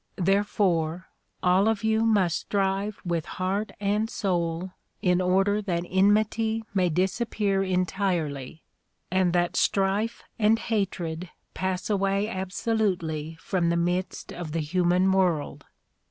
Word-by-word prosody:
Therefore 185 Hz, -3 st, +1 dB, 0.3 s
all 185 Hz, +3 st, +4 dB
of 225 Hz, -1 st, 0 dB
you 220 Hz, 0 st, +2 dB
must 205 Hz, -7 st, +2 dB
strive 195 Hz, +1 st, -1 dB
with 170 Hz, -2 st, -1 dB
heart 195 Hz, +3 st, -1 dB
and 210 Hz, +2 st, 0 dB
soul 175 Hz, -3 st, -1 dB, 0.3 s
in 180 Hz, 0 st, +3 dB
order 195 Hz, +3 st, +2 dB
that 175 Hz, -4 st, -1 dB
enmity 215 Hz, +3 st, +2 dB
may 185 Hz, -3 st, +2 dB
disappear 195 Hz, +3 st, 0 dB
en 185 Hz, -1 st, +1 dB
tirely 160 Hz, -7 st, -2 dB, 0.5 s
and 185 Hz, -1 st, +2 dB
that 175 Hz, -1 st, +1 dB
strife 200 Hz, +4 st, +1 dB, 0.2 s
and 220 Hz, +1 st, +4 dB
hatred 185 Hz, -7 st, -2 dB, 0.2 s
pass 185 Hz, -1 st, -2 dB
away 200 Hz, 0 st, +1 dB
absolutely 185 Hz, -6 st, -2 dB
from 175 Hz, -2 st, 0 dB
the 170 Hz, -, +1 dB
midst 175 Hz, +2 st, -2 dB
of 165 Hz, -3 st, -6 dB
the 165 Hz, -, 0 dB
human 180 Hz, +4 st, +2 dB
world. 180 Hz, -6 st, 0 dB
190 Hz, 125 wpm, -26 LUFS, 175-205 Hz, 0.5 s, all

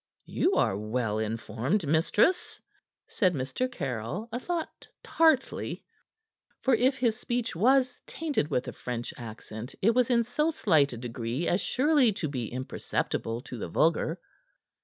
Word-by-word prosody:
"You -, -, +1 dB
are -, -, +2 dB
well 110 Hz, +1 st, -1 dB
informed, 115 Hz, -, -1 dB
mistress," 175 Hz, -, +2 dB, 0.5 s
said 185 Hz, -5 st, +1 dB
Mr. 135 Hz, -, -2 dB
Caryll, 135 Hz, -, -4 dB
a 240 Hz, -, -2 dB
thought 340 Hz, +4 st, -4 dB, 0.2 s
tartly, 315 Hz, -5 st, +1 dB, 0.8 s
for 265 Hz, -, +2 dB
if 255 Hz, +4 st, +3 dB
his 235 Hz, -2 st, +1 dB
speech 240 Hz, -5 st, -2 dB
was 255 Hz, +6 st, +3 dB
tainted 300 Hz, -, -1 dB
with 125 Hz, -, -1 dB
a -, -, -5 dB
French 120 Hz, -1 st, -5 dB
accent 110 Hz, +1 st, -8 dB
it 225 Hz, +4 st, +4 dB
was 250 Hz, 0 st, +3 dB
in 235 Hz, -2 st, +4 dB
so 300 Hz, +7 st, 0 dB
slight 160 Hz, -, +3 dB
a 120 Hz, -, -6 dB
degree 120 Hz, +5 st, -3 dB
as 180 Hz, -, +2 dB
surely 275 Hz, -3 st, +3 dB
to 175 Hz, -5 st, -3 dB
be 125 Hz, -6 st, -4 dB
imperceptible 120 Hz, -2 st, -3 dB
to 125 Hz, -2 st, -8 dB
the 90 Hz, -, -4 dB
vulgar. 160 Hz, -, +1 dB
170 Hz, 145 wpm, -28 LUFS, -, 0.8 s, it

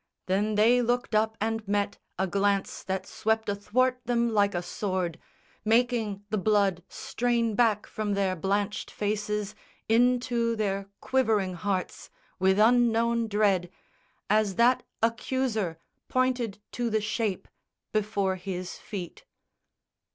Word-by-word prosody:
Then 205 Hz, +3 st, +1 dB
they 235 Hz, +4 st, +5 dB
looked 245 Hz, 0 st, 0 dB
up 220 Hz, +1 st, +2 dB
and 225 Hz, 0 st, -2 dB
met 205 Hz, 0 st, -1 dB, 0.2 s
A 190 Hz, -, +1 dB
glance 200 Hz, +1 st, 0 dB
that 190 Hz, 0 st, -2 dB
swept 220 Hz, 0 st, -1 dB
athwart 250 Hz, +5 st, +1 dB
them 235 Hz, 0 st, +1 dB
like 200 Hz, -2 st, +3 dB
a 175 Hz, -, -1 dB
sword, 180 Hz, -3 st, -2 dB, 0.4 s
Making 225 Hz, -3 st, +1 dB
the 215 Hz, -, +1 dB
blood 200 Hz, -3 st, +2 dB
strain 235 Hz, -2 st, -1 dB
back 215 Hz, -2 st, +2 dB
from 210 Hz, -2 st, -2 dB
their 195 Hz, -2 st, +1 dB
blanched 200 Hz, +4 st, -1 dB
faces 210 Hz, 0 st, -2 dB, 0.3 s
Into 240 Hz, 0 st, +2 dB
their 200 Hz, -2 st, -1 dB
quivering 220 Hz, -8 st, +1 dB
hearts, 185 Hz, +1 st, -3 dB, 0.3 s
with 190 Hz, +1 st, +3 dB
unknown 235 Hz, 0 st, +3 dB
dread, 200 Hz, -4 st, +2 dB, 0.6 s
As 210 Hz, -2 st, +2 dB
that 245 Hz, +4 st, +4 dB, 0.2 s
accuser 225 Hz, -6 st, 0 dB, 0.3 s
pointed 255 Hz, -5 st, 0 dB
to 240 Hz, -1 st, -2 dB
the 220 Hz, 0 st, +1 dB
shape 215 Hz, -1 st, -2 dB, 0.4 s
Before 200 Hz, -3 st, 0 dB
his 185 Hz, -1 st, -5 dB
feet. 185 Hz, -5 st, -7 dB
210 Hz, 120 wpm, -28 LUFS, 195-230 Hz, 0.6 s, they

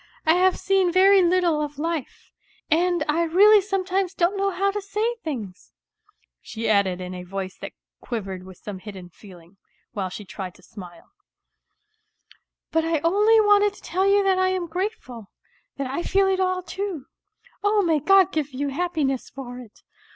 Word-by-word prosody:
I 320 Hz, -, +5 dB
have 370 Hz, +1 st, +3 dB
seen 385 Hz, -2 st, +1 dB
very 385 Hz, +2 st, +5 dB
little 345 Hz, -3 st, +2 dB
of 295 Hz, -1 st, -5 dB
life, 320 Hz, -2 st, -5 dB, 0.4 s
and 345 Hz, 0 st, +2 dB
I 305 Hz, +3 st, +1 dB
really 400 Hz, +6 st, +6 dB
sometimes 385 Hz, -1 st, -2 dB
don't 350 Hz, +3 st, +1 dB
know 395 Hz, 0 st, 0 dB
how 395 Hz, +1 st, 0 dB
to 415 Hz, +1 st, -4 dB
say 425 Hz, +4 st, -1 dB
things," 220 Hz, -, -7 dB, 0.7 s
she 230 Hz, 0 st, -5 dB
added 200 Hz, -4 st, +2 dB
in 180 Hz, 0 st, -6 dB
a 180 Hz, -, -7 dB
voice 190 Hz, +1 st, -6 dB
that -, -, -8 dB, 0.3 s
quivered 195 Hz, -6 st, -5 dB
with 185 Hz, -1 st, -13 dB
some 205 Hz, -3 st, -8 dB
hidden 190 Hz, -3 st, -10 dB
feeling, 180 Hz, -1 st, -16 dB, 0.3 s
while 190 Hz, -3 st, -3 dB
she 205 Hz, +3 st, -9 dB
tried 190 Hz, -1 st, -7 dB
to 185 Hz, -, -20 dB
smile; 175 Hz, -3 st, -13 dB, 0.8 s
" 435 Hz, 0 st, -33 dB
but 325 Hz, 0 st, +1 dB
I 325 Hz, 0 st, 0 dB
only 415 Hz, +7 st, +4 dB
wanted 415 Hz, -1 st, +3 dB
to -, -, -16 dB
tell 380 Hz, +2 st, 0 dB
you 400 Hz, 0 st, +4 dB
that 380 Hz, -1 st, +2 dB
I 375 Hz, -, +3 dB
am 370 Hz, -1 st, -1 dB
grateful, 325 Hz, -, -5 dB, 0.5 s
that 275 Hz, -, -3 dB
I 270 Hz, +6 st, -3 dB
feel 390 Hz, +2 st, +2 dB
it 380 Hz, -1 st, +1 dB
all 370 Hz, -1 st, 0 dB
too... 370 Hz, -4 st, -5 dB, 0.6 s
Oh, 410 Hz, 0 st, +3 dB
may 325 Hz, -4 st, +2 dB
God 385 Hz, +4 st, +4 dB
give 295 Hz, -3 st, -3 dB
you 285 Hz, +2 st, -2 dB
happiness 290 Hz, -4 st, -2 dB
for 250 Hz, -2 st, -9 dB
it 235 Hz, -4 st, -15 dB
335 Hz, 175 wpm, -23 LUFS, -, 0.8 s, really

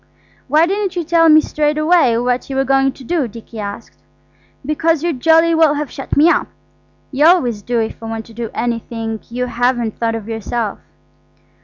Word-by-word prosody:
"Why 305 Hz, +4 st, +4 dB
didn't 390 Hz, +1 st, -2 dB
you 350 Hz, -, -1 dB
tell 330 Hz, 0 st, +3 dB
me 310 Hz, 0 st, +7 dB
straight 300 Hz, 0 st, -1 dB
out 305 Hz, -7 st, +3 dB
what 250 Hz, +1 st, -1 dB
you 270 Hz, -, -4 dB
were 270 Hz, -, +2 dB
going 270 Hz, 0 st, +2 dB
to 270 Hz, -, -14 dB
do?" 295 Hz, 0 st, -1 dB
Dicky 230 Hz, 0 st, -11 dB
asked. 205 Hz, +2 st, -7 dB, 0.7 s
"Because 315 Hz, +1 st, 0 dB
you'd 335 Hz, -7 st, -2 dB
jolly 325 Hz, +3 st, +4 dB
well 320 Hz, -2 st, +4 dB
have 295 Hz, -1 st, -4 dB
shut 270 Hz, -, -5 dB
me 300 Hz, +3 st, +6 dB
up. -, -, +2 dB, 0.6 s
You 290 Hz, +3 st, +3 dB
always 250 Hz, -, +3 dB
do 240 Hz, +3 st, -1 dB
if 225 Hz, 0 st, -4 dB
I 225 Hz, -, -7 dB
want 225 Hz, 0 st, -5 dB
to 230 Hz, -, -15 dB
do 230 Hz, 0 st, -5 dB
anything 230 Hz, -1 st, -3 dB
you 250 Hz, +2 st, -3 dB
haven't 240 Hz, -2 st, -1 dB
thought 230 Hz, -1 st, 0 dB
of 225 Hz, -2 st, -7 dB
yourself." 225 Hz, -1 st, -3 dB
260 Hz, 190 wpm, -17 LUFS, 230-315 Hz, 0.7 s, me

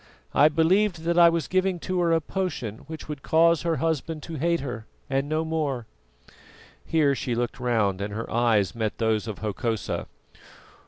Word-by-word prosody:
I 150 Hz, +2 st, +6 dB
believed 170 Hz, +3 st, +2 dB
that 170 Hz, +1 st, +2 dB
I 170 Hz, -1 st, +8 dB
was 165 Hz, -3 st, -1 dB
giving 185 Hz, 0 st, +1 dB
to 185 Hz, -1 st, -2 dB
her 170 Hz, -1 st, +2 dB
a 165 Hz, -, +4 dB
potion 145 Hz, -, -4 dB
which 160 Hz, -1 st, -8 dB
would 150 Hz, -2 st, -6 dB
cause 165 Hz, +1 st, +4 dB
her 165 Hz, -1 st, 0 dB
husband 160 Hz, +1 st, -2 dB
to 165 Hz, -, -7 dB
hate 170 Hz, +2 st, +1 dB
her 125 Hz, -5 st, -6 dB, 0.2 s
and 135 Hz, +2 st, 0 dB
no 155 Hz, +1 st, 0 dB
more." 150 Hz, -7 st, -2 dB, 1.0 s
Here 155 Hz, -4 st, +2 dB
she 125 Hz, -2 st, -2 dB
looked 120 Hz, +2 st, -2 dB
round 110 Hz, -6 st, +1 dB
and 100 Hz, +1 st, -3 dB
her 110 Hz, +3 st, -4 dB
eyes 115 Hz, -4 st, +2 dB
met 110 Hz, -2 st, -2 dB
those 110 Hz, -1 st, 0 dB
of 110 Hz, -, -5 dB
Hokosa. 110 Hz, -2 st, -2 dB
150 Hz, 175 wpm, -25 LUFS, 115-165 Hz, 1.0 s, I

